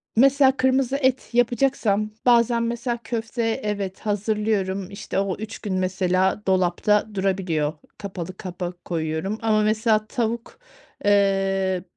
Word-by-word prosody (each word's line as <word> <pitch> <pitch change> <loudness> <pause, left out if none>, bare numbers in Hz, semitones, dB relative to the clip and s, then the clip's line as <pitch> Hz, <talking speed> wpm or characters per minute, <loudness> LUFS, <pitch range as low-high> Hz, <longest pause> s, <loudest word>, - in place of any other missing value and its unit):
mesela, 270 +2 +5
kırmızı 260 0 +2
et 260 -2 0
yapacaksam 235 -3 +1
bazen 235 -1 +4
mesela, 235 +1 -2
köfte 230 0 -3 0.2
evet, 200 -2 -3
hazırlıyorum, 205 -2 -1
işte, 200 -1 -3
o 195 -2 -1
3 220 +1 -7
gün 205 -3 -4
mesela 185 +1 +1
dolapta 190 +3 +2
durabiliyor. 185 -6 0 0.2
Kapalı 185 -2 -6
kapak 180 -1 -6
koyuyorum. 160 +4 -2
Ama 215 -1 +2
mesela, 215 0 +2
tavuk, 235 - -3 0.5
eee, 195 -2 +2
210 Hz, 115 wpm, -23 LUFS, 190-235 Hz, 0.5 s, mesela